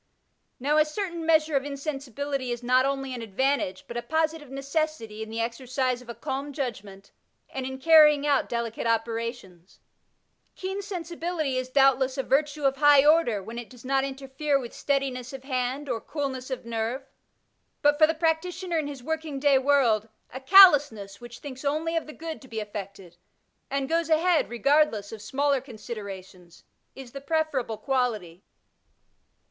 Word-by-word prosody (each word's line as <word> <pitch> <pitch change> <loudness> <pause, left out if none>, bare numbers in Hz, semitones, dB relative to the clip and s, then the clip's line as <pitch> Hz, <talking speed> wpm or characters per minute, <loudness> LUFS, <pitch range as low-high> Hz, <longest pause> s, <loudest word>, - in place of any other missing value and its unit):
Now 290 +4 +1
a - - +7
certain 340 +1 -4
measure 315 -2 +3
of 270 - +2
insensibility 280 -2 -4
is 240 0 -4
not 255 +2 +3
only 270 -1 -3
an 245 - -5
advantage, 225 -2 -1
but 235 - -6
a - - -1
positive 315 0 -1
necessity 275 -5 -3
in 220 - -6
the 225 +1 -5
exercise 250 +2 -2
of 245 - -15
a 235 - -6
calm 275 +5 -4
judgment, 200 -8 -6 0.4
and 260 -1 -4
in 265 0 -6
carrying 300 0 +6
out 285 -2 +2
delicate 235 -1 -3
operations. 225 -5 -3 0.8
Keen 385 +2 -4
sensibility 340 -6 -3
is 255 0 -2
doubtless 270 -1 +3
a 270 - 0
virtue 295 +2 0
of 275 0 +2
high 290 -1 +6
order, 295 -10 +3
when 230 +4 -7
it 240 - -9
does 250 -1 -15
not 270 +1 +1
interfere 275 +2 -1
with 245 -3 -7
steadiness 270 -2 -2
of 265 -1 -8
hand 260 +1 -2
or 225 -4 -2
coolness 270 -4 -4
of 260 -3 -5
nerve; 230 +3 -3 0.8
but 290 0 +4
for 310 - +7
the 320 - -1
practitioner 335 +2 -1
in 300 - -2
his 280 -4 -8
working 315 -1 -3
day 275 -1 +4
world, 250 -6 +2 0.2
a 260 - -5
callousness 285 - +6
which 240 0 -10
thinks 265 -2 -9
only 310 +4 -1
of 330 - -1
the - - -7
good 325 0 -7
to 260 - -14
be 225 -3 -5
effected, 200 -4 -8 0.5
and 275 0 -1
goes 330 +1 0
ahead 325 +1 +3
regardless 240 -3 +2
of 220 -2 -8
smaller 275 +4 0
considerations, 200 -8 -9 0.3
is 265 -2 -10
the 275 - -8
preferable 280 -6 -1
quality. 220 -11 -2
270 Hz, 165 wpm, -26 LUFS, 235-300 Hz, 0.8 s, a